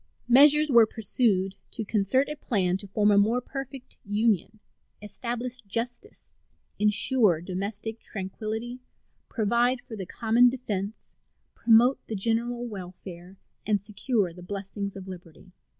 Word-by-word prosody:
Measures 295 +4 +6
were 235 -3 +7
pursued 200 -3 0
to 225 - -5
concert 215 +6 +1
a 300 - -5
plan 190 -10 0
to 200 +1 -5
form 210 +2 +2
a 200 - +5
more 225 +5 +2
perfect 270 0 -8
union, 215 0 0 0.4
establish 240 +4 -4
justice, 240 - -5 0.5
insure 210 - +4
domestic 200 +5 -4
tranquillity, 220 +5 -6 0.5
provide 235 +3 +1
for 230 - -10
the 190 -4 -6
common 235 +2 +3
defense, 215 -5 -5 0.4
promote 240 +3 +4
the 220 - -4
general 235 +4 -1
welfare, 185 -3 -9 0.3
and 210 -1 +1
secure 205 -1 -1
the 180 - -12
blessings 200 +1 -6
of 190 -1 -9
liberty. 180 0 -12
215 Hz, 125 wpm, -26 LUFS, 195-240 Hz, 0.5 s, were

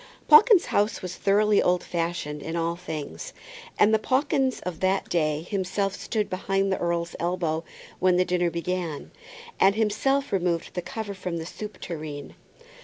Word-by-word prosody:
Pawkins's 450 -4 +7
house 205 0 +1
was 185 0 -4
thoroughly 205 +1 +3
old 180 0 +2
fashioned 165 -3 -3
in 165 +3 -5
all 170 0 0
things, 175 - -6 0.4
and 215 - +5
the 220 - +4
Pawkins 265 +1 +1
of 180 -3 -5
that 190 +1 +1
day 155 -2 0
himself 195 +1 -1
stood 215 0 -2
behind 195 +1 -1
the - - 0
earl's 170 0 -1
elbow 170 -2 -1 0.4
when 185 -1 +3
the 185 - +3
dinner 180 -1 +1
began, 170 -2 -4 0.5
and 195 +1 +5
himself 270 +6 +1
removed 175 -3 0
the 180 - -2
cover 205 +3 -5
from 180 -3 -4
the 160 - -5
soup 210 +4 -8
tureen. 150 -4 -6
180 Hz, 160 wpm, -26 LUFS, 170-210 Hz, 0.5 s, Pawkins's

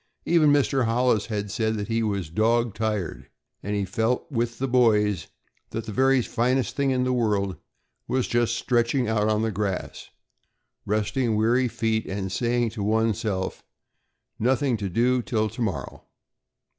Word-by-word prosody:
Even 160 -3 +4
Mr. 135 -3 +2
Hollis 115 -2 +1
had 105 -2 -3
said 110 0 0
that 105 -1 -4
he 115 0 0
was 100 -7 -2
"dog 115 +3 +2
tired," 105 -4 -3 0.3
and 105 +1 -3
he 100 -1 0
felt 110 +6 0
with 120 -2 -1
the 135 - -1
boys 105 - +2 0.4
that 115 - -5
the 110 - -5
very 130 +3 +3
finest 125 0 0
thing 140 -1 +1
in 130 -1 +1
the 125 0 +1
world 105 -6 0 0.5
was 130 -1 0
just 120 -1 +1
stretching 120 +1 +1
out 110 -1 +1
on 110 0 +1
the 110 - 0
grass, 100 -2 -4 0.8
resting 110 +3 0
weary 120 +4 +2
feet, 110 -1 -1
and 95 -1 -3
saying 120 +3 0
to 110 -2 -6
one's 110 +1 +1
self: 95 -4 -3 0.8
"Nothing 130 +2 +2
to 100 -2 -3
do 125 +6 +2
till 110 -2 -1
tomorrow." 115 -3 -4
115 Hz, 155 wpm, -25 LUFS, 105-125 Hz, 0.8 s, Even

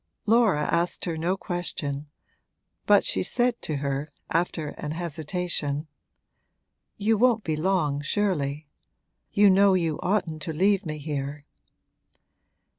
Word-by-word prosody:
Laura 215 -8 +4
asked 170 +3 0
her 170 - -2
no 170 +4 -1
question, 150 -6 -2 0.8
but - - +5
she - - +1
said 245 -1 +1
to 155 - -2
her, 140 +1 -3 0.2
after 165 -2 0
an 150 +1 -5
hesitation: 160 -2 -2 1.1
'You 210 +1 +2
won't 235 -3 +3
be 155 - -1
long, 155 -4 0
surely. 150 -4 -1 0.6
You 205 0 +5
know 195 0 +5
you 165 -4 0
oughtn't 175 -5 -1
to 160 +2 -4
leave 195 +3 +2
me 155 0 -4
here.' 145 -1 -4
165 Hz, 120 wpm, -26 LUFS, 150-195 Hz, 1.1 s, but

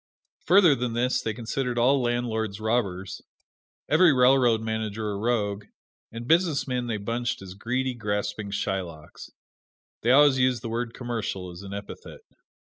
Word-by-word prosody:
Further 180 -2 +6
than 125 -3 -2
this 125 +2 0
they 110 - -2
considered 120 +2 -3
all 130 +3 +3
landlords 115 -4 -2
robbers, 105 -5 -2 0.7
every 180 -3 +5
railroad 125 -3 +4
manager 110 -1 -3
a - - -3
rogue, 105 -2 -1 0.5
and 115 +1 -7
businessmen 140 -7 +1
they 115 -2 -2
bunched 115 +3 -3
as 95 -1 -9
greedy, 125 +6 -2
grasping 105 -2 -3
Shylocks. 95 -6 -5 0.7
They 115 - 0
always 135 0 +6
used 125 -1 +1
the 115 - -4
word 115 0 -3
"commercial" 110 -7 -4
as 85 +1 -10
an 100 0 -7
epithet. 100 0 -9
115 Hz, 140 wpm, -26 LUFS, 105-125 Hz, 0.7 s, Further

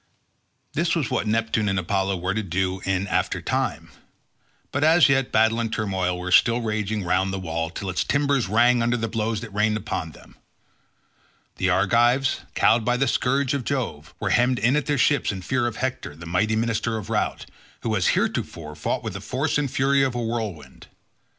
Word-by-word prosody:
This 165 +1 +1
was 150 -9 -1
what - - 0
Neptune 110 -1 +1
and 95 - 0
Apollo 95 +1 0
were 90 +2 -2
to 110 - -1
do 95 0 -2
in 95 0 0
after 95 - -1
time; - - -2 0.8
but 140 - -1
as 160 +1 +6
yet 135 -1 +2
battle 110 +1 +3
and 115 -1 -2
turmoil 95 -5 -1
were 90 +1 -5
still 115 +6 +5
raging 110 -2 -2
round 90 +2 +1
the 95 - -3
wall 80 -3 -3
till 95 +3 -6
its 90 - 0
timbers 140 -4 +1
rang 120 +3 +4
under 120 +1 +1
the 115 -1 -2
blows 110 -1 -2
that 110 -4 -9
rained 105 +1 +1
upon 95 -7 -4
them. - - -17 1.2
The 95 - +1
Argives, 120 +8 +3 0.2
cowed 110 +1 +4
by 125 +2 +1
the 135 +2 +1
scourge 135 +2 +1
of 140 -3 -2
Jove, 120 - -4
were - - -1
hemmed 125 +2 +3
in 120 +4 +2
at 150 - 0
their 145 -1 +1
ships 140 0 +2
in 95 -2 -6
fear 120 +5 0
of 115 - -4
Hector 130 - -4
the 85 +2 -11
mighty 105 +6 +1
minister 115 0 -1
of 110 +1 -7
Rout, 105 - -1 0.4
who 110 -1 -1
as 90 - +1
heretofore 75 -2 -2
fought 75 - -2
with - - -4
the - - -6
force 140 +3 -1
and 145 -2 -1
fury 135 +2 +2
of 130 -2 0
a - - -1
whirlwind. 105 - -5
110 Hz, 195 wpm, -24 LUFS, 95-125 Hz, 1.2 s, as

